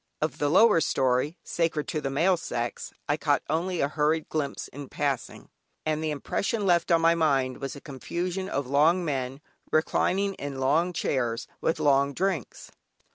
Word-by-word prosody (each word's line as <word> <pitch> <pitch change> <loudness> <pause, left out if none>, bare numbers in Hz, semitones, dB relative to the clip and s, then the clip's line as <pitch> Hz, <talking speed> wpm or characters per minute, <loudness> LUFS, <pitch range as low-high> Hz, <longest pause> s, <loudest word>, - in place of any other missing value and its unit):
Of 155 - -2
the 145 - +1
lower 205 +1 +6
story, 130 +4 +1
sacred 165 -3 -1
to 155 - -2
the 135 - -2
male 170 +7 +3
sex, 120 -8 -4 0.2
I 145 - +1
caught 145 -2 +1
only 170 +3 -1
a 140 - +2
hurried 155 +2 0
glimpse 150 -3 -3
in 140 -1 -9
passing, 140 -4 -3 0.4
and 155 0 0
the 155 - 0
impression 200 +8 -2
left 175 -2 +3
on 165 -1 +5
my 165 0 +5
mind 135 -6 +1
was 135 -1 -4
a 140 - -10
confusion 175 +6 -4
of 140 0 -1
long 155 +7 +3
men, 135 -2 -3 0.3
reclining 195 +5 +1
in 140 -5 -6
long 155 +7 +2
chairs, 120 -7 -1 0.2
with 160 - 0
long 140 -2 +3
drinks. 185 - -2
150 Hz, 170 wpm, -27 LUFS, 140-170 Hz, 0.4 s, lower